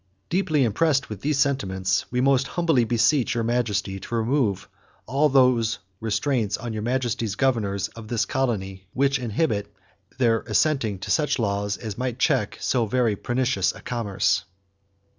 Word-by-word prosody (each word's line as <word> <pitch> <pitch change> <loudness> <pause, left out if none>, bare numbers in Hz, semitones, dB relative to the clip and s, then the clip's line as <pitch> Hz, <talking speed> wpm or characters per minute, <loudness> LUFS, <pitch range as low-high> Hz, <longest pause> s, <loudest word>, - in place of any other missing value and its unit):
Deeply 165 -6 +2
impressed 135 +4 +1
with 105 -3 -7
these 150 0 0
sentiments, 95 -9 0
we 125 - 0
most 135 0 +3
humbly 165 -8 +2
beseech 120 +4 +2
Your 115 - 0
Majesty 105 -5 -1
to 120 - -5
remove 115 -4 0 0.4
all 140 +5 +2
those 125 -4 +3 0.2
restraints 110 0 0
on 120 -1 -5
Your 110 - -3
Majesty's 120 -3 -1
governors 105 -7 0
of 115 -2 -11
this 115 0 0
colony 95 -8 -2
which 140 0 +2
inhibit 110 -4 -1 0.5
their 115 -3 +3
assenting 115 -3 +1
to 95 - -5
such 150 -3 +2
laws 100 -2 -1
as 110 -1 -6
might 125 -2 -2
check 105 -5 +1
so 120 -3 0
very 115 -1 +1
pernicious 125 +4 0
a - - -12
commerce." 115 -5 0
120 Hz, 150 wpm, -24 LUFS, 105-135 Hz, 0.5 s, most